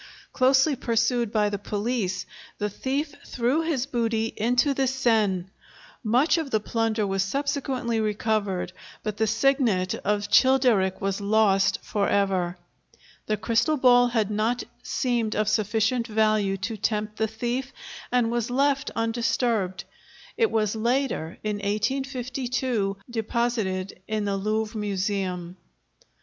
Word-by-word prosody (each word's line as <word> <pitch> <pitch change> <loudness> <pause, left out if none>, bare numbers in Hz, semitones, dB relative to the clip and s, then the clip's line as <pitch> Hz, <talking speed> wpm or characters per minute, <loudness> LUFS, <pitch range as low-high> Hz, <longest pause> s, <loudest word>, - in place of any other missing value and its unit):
Closely 265 +3 +4
pursued 235 -1 0
by 210 -2 +2
the 205 -1 -3
police, 205 -3 -2 0.3
the 210 0 -2
thief 280 +7 -2
threw 250 +6 0
his 310 -6 -1
booty 230 -4 -1
into 245 +6 +2
the 270 -1 +1
Seine; 220 -8 +1 0.6
much 260 +9 +3
of 310 -4 -4
the 220 - +1
plunder 225 0 0
was 195 -1 0
subsequently 265 0 -1
recovered, 210 -4 -1 0.3
but 215 -1 -3
the 220 - +1
signet 225 -5 +2
of 205 0 -1
Childeric 230 -5 +4
was 195 +1 -1
lost 200 -2 +3
for 205 -2 0
ever. 185 -3 +1 0.7
The 215 - 0
crystal 230 +8 +1
ball 245 -2 +6
had 220 -4 0
not 220 +4 0 0.2
seemed 235 -4 -1
of 215 -1 +1
sufficient 220 +3 +1
value 215 -3 +2
to 220 +3 -4
tempt 210 0 -2
the 220 - +1
thief 240 +4 -3 0.4
and 245 -2 +2
was 235 -1 -1
left 275 +2 +1
undisturbed; 225 -4 0 0.5
it 455 -2 +2
was 215 -1 0
later, 235 - -1
in 210 -1 -1
1852, 245 0 -1
deposited 220 -5 -2
in 215 -1 -1
the 200 -1 0
Louvre 215 +3 -1
Museum. 190 -3 -2
220 Hz, 130 wpm, -25 LUFS, 205-250 Hz, 0.7 s, ball